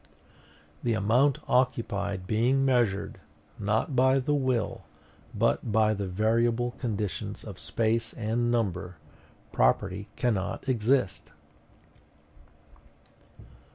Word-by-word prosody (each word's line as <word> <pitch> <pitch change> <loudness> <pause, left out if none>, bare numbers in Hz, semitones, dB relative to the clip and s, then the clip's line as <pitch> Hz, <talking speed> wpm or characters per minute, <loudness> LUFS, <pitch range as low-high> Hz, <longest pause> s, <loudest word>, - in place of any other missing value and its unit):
THE 115 -2 0
AMOUNT 120 +8 +3
OCCUPIED 100 -6 0
BEING 120 +7 +2
MEASURED, 120 -7 +1 0.4
NOT 110 +7 0
BY 130 +1 +4
THE 135 +2 0
WILL, 130 -6 0 0.5
BUT 115 - +1
BY 110 0 +3
THE 100 -2 -3
VARIABLE 115 +5 +1
CONDITIONS 105 -6 -3
OF - - -9
SPACE 115 0 -1
AND 120 +1 -1
NUMBER, 95 -7 -1 0.5
PROPERTY 100 - +1
CANNOT 110 -3 -1
EXIST. 120 -4 +1
115 Hz, 90 wpm, -28 LUFS, 100-125 Hz, 0.5 s, BY